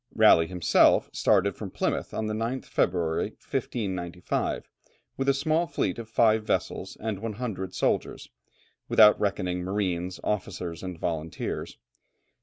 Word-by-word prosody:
Raleigh 80 0 +6
himself 90 -1 +3
started - - +2
from - - -6
Plymouth - - -2
on 110 - -3
the 110 - -2
9th 115 +4 -2
February, 85 -3 0
1595, 90 -5 -3 0.5
with 135 0 0
a - - +5
small 160 +4 +1
fleet 95 - -1
of 115 -1 -8
five 110 -1 +3
vessels, - - -2
and 110 -3 -3
100 105 -4 -4
soldiers, - - -1 0.6
without 105 -1 +7
reckoning 95 -3 -1
marines, 90 -2 -2
officers, 90 -5 -3
and 90 -2 -6
volunteers. 80 -1 -4
95 Hz, 125 wpm, -27 LUFS, 90-110 Hz, 0.6 s, without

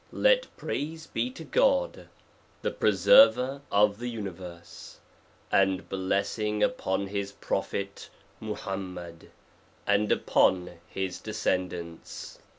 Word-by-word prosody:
praise 160 +2 -4
be 250 - -2
to 260 - -10
GOD, - - +1 0.5
the - - 0
Preserver 140 - +5
of 105 +1 +3
the 120 - -4
universe 90 -6 -8 0.5
j - - +4
and 95 -1 0
blessing 100 +3 0
upon 95 +1 0
his 100 0 -4
prophet 100 0 -3 0.3
MUHAM 95 -3 -5
MED, 85 -2 -10 0.6
and 100 +1 +2
upon 90 -2 +2
his 95 -1 -3
descendants. 90 -2 -3
100 Hz, 100 wpm, -28 LUFS, 95-115 Hz, 0.6 s, Preserver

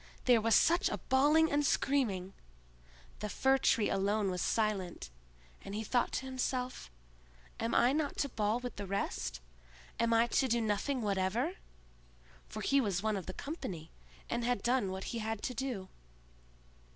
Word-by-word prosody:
There 245 -3 +5
was 225 0 +4
such 340 +2 +4
a - - -2
bawling 295 +5 +3
and 290 +1 +2
screaming!—the 60 - -3
Fir 265 +6 +2
tree 220 -5 +3
alone 200 +1 +1
was 180 -1 -2
silent, 195 - -1 0.5
and 195 - -6
he 220 - -2
thought 245 +3 +1
to - - -2
himself, 255 - -3 0.7
"Am 230 +1 -1
I 245 +3 +5
not 300 -1 -1
to 280 - 0
bawl 215 0 0
with 245 -2 -6
the 200 -1 -5
rest?—am 60 - -4
I 230 0 +5
to 260 +3 +1
do 235 -1 +2
nothing 225 +4 -1
whatever?" 210 - 0 0.9
for - - -6
he 275 0 +3
was 200 -5 -1
one 215 -1 +1
of 190 -4 -5
the 185 - -4
company, 185 - -6 0.4
and 235 0 -2
had 245 -4 0
done 240 -4 +2
what 190 0 -5
he 235 - -2
had 220 -1 -3
to 255 - -2
do. 240 -6 -3
220 Hz, 160 wpm, -33 LUFS, 190-255 Hz, 0.9 s, There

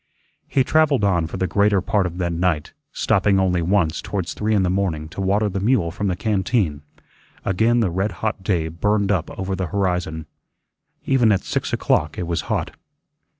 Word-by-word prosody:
He 135 - +2
travelled 150 -4 +2
on 90 -5 +2
for 80 - -6
the 95 - 0
greater 100 +2 +2
part 95 +1 +1
of 90 0 -7
that 85 -2 -1
night, 85 -3 -1 0.2
stopping 100 -1 +2
only 90 -2 +1
once 85 -2 +1
towards 95 -4 -3
three 110 +1 0
in 100 - +3
the 90 - +1
morning 90 -5 -1
to 95 - -6
water 100 +3 +2
the 100 -1 -2
mule 100 -5 +1
from 100 +3 -3
the 90 - 0
canteen. 95 - 0 0.6
Again 115 +5 +2
the 95 -6 +1
red 95 +3 -1
hot 105 +2 -3
day 90 -4 0
burned 100 +5 0
up 95 -6 0
over 95 0 -2
the 95 -1 -2
horizon. 90 -4 -1 0.8
Even 125 -5 +3
at 95 -2 +2
six - - -2
o'clock 75 +1 0
it 90 - -2
was 85 0 -1
hot. - - -1
95 Hz, 190 wpm, -21 LUFS, 85-105 Hz, 0.8 s, in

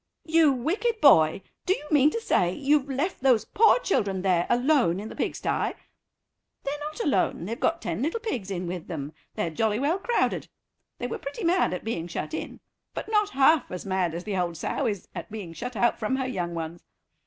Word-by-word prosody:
"You 320 -2 +5
wicked 380 - -1
boy, 165 - +6 0.2
do 375 - +4
you 300 - -10
mean 295 -1 +6
to 460 - -3
say 180 - +2
you've 285 +4 +1
left 280 +7 -2
those 255 -5 +4
poor 445 +1 +5
children 200 - 0
there 180 -3 +2
alone 245 - +3
in 215 +2 -6
the - - -9
pigstye?" - - -1 0.9
"They're 285 +1 -3
not 300 +1 -6
alone, 195 - +1
they've 230 +6 -4
got 330 +1 0
ten 170 +5 -2
little 325 - -1
pigs 255 - -4
in 180 -2 -3
with 175 -1 -5
them; 150 -3 -5 0.2
they're 165 - -1
jolly 215 +6 +1
well 300 +9 +1
crowded. 475 +4 0 0.5
They - - -4
were 245 - -4
pretty 290 +11 -6
mad 355 +2 +3
at 180 - -4
being 175 -7 -3
shut 175 - -5
in, - - -5 0.3
but - - -5
not 420 -1 +3
half 280 -1 +4
as 180 - -6
mad 185 -4 0
as 175 - -5
the 205 -1 -3
old 175 -2 -1
sow - - -1
is 205 -4 -3
at 170 - -7
being 205 -6 -7
shut 245 +7 -6
out 240 +3 +2
from 225 +4 0
her 265 -1 -1
young 175 -9 -3
ones. 165 +1 -5
240 Hz, 205 wpm, -26 LUFS, 180-300 Hz, 0.9 s, boy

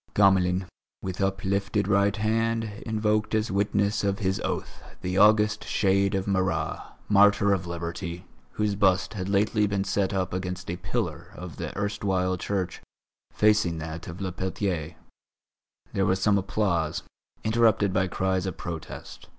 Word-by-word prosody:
Gamelin, 95 -2 +4 0.4
with 95 0 -4
uplifted 100 +1 0
right 100 0 +3
hand, 115 +1 +1 0.2
invoked 110 0 +1
as 110 -1 0
witness 100 +1 +1
of 100 -1 +1
his 95 -2 0
oath - - -4 0.2
the 90 +1 0
august 105 0 +5
shade 100 0 +2
of 95 -1 -1
Marat, 95 -1 0 0.3
martyr 100 0 +5
of 90 -2 -2
Liberty, 85 +1 -5 0.3
whose 105 -1 0
bust 95 0 +2
had 95 -2 -4
lately 105 +1 +2
been 100 -1 0
set 100 0 0
up 95 -2 -1
against 90 -1 -4
a - - -2
pillar - - -3
of 90 -3 -8
the - - -4
erstwhile 100 -3 0
church, 95 0 -3 0.5
facing 105 -6 +3
that 80 +1 -6
of 85 0 -7
Le 95 -2 -2
Peltier. 90 -3 -3 1.0
There 95 -1 +1
was 95 +1 +2
some 100 +1 +3
applause, 85 -5 0 0.4
interrupted 110 -3 +3
by 95 0 +2
cries 95 +1 0
of 95 - -4
protest. 85 -2 -7
95 Hz, 145 wpm, -26 LUFS, 90-105 Hz, 1.0 s, august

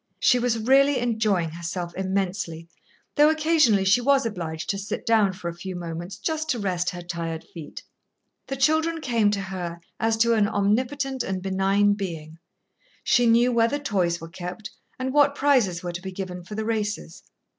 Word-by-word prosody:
She 250 - +4
was 240 -1 +1
really 270 +5 +4
enjoying 215 -8 0
herself 170 +1 -5
immensely, 190 -3 -2 0.5
though 295 +1 +7
occasionally 310 -10 +3
she 200 +6 +4
was 275 0 +3
obliged 165 -7 -4
to 195 - -4
sit 200 - -5
down 220 -4 +4
for 180 -1 -7
a 170 - -3
few 185 +2 -7
moments 175 +2 -6
just 315 +8 -3
to 245 - +1
rest 180 -3 -1
her 175 -1 -7
tired 165 -2 -4
feet. 160 -4 -9 0.6
The 270 - -3
children 315 +4 +2
came 235 -8 +2
to 205 -1 -1
her 180 -3 -5 0.2
as 225 0 +1
to 235 +1 +3
an 215 -2 +3
omnipotent 255 +7 0
and 190 -4 -2
benign 195 +2 +2
being. 165 -5 -6 0.6
She 245 -1 +3
knew 235 +2 +4
where 230 -1 +3
the 285 - -1
toys 185 -11 0
were 165 - -8
kept 180 +4 -7 0.3
and 260 0 -3
what 285 -1 +4
prizes 250 -12 +2
were 175 -1 -4
to 175 - -5
be 190 0 -6
given 180 -1 -6
for 210 +4 -8
the 220 0 -3
races. 215 -2 -3
205 Hz, 180 wpm, -25 LUFS, 180-245 Hz, 0.6 s, though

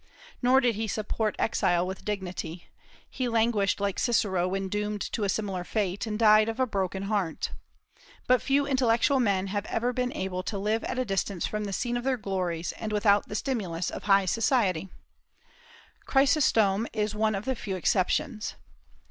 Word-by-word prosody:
Nor 260 +1 +5
did 245 -3 +2
he 220 +1 -3
support 215 0 -2
exile 175 -5 +1
with 190 +1 -6
dignity; 185 -4 -4 0.4
he 255 -2 -3
languished 225 -4 +1
like 200 -1 -1
Cicero 190 -7 +1
when 195 +1 -2
doomed 210 +1 -2
to 220 - -1
a - - -1
similar 195 -3 -2
fate, 200 +1 -2
and 210 -1 -2
died 215 0 +5
of 225 +3 -5
a 260 - +4
broken 195 -4 -2
heart. 195 -5 -1 0.7
But 255 0 +4
few 280 +1 +2
intellectual 260 0 +2
men 200 -5 +1
have 205 0 -2
ever 245 +2 -1
been 250 0 -1
able 185 -1 -3
to 200 +2 -4
live 215 +3 0
at - - -3
a 255 - 0
distance 195 -3 -1
from 210 0 -3
the 200 - -4
scene 240 +5 -1
of 240 - -4
their 260 -1 +1
glories, 180 -5 -2
and 220 - -4
without 205 -1 +3
the 210 - -6
stimulus 190 -9 -2
of - - -7
high 195 -1 +4
society. 195 - +1 1.2
Chrysostom 235 -7 +3
is 215 -1 -1
one 215 0 +1
of 195 +2 -4
the 265 - 0
few 205 -5 -4
exceptions. 210 - 0
210 Hz, 175 wpm, -27 LUFS, 195-235 Hz, 1.2 s, Nor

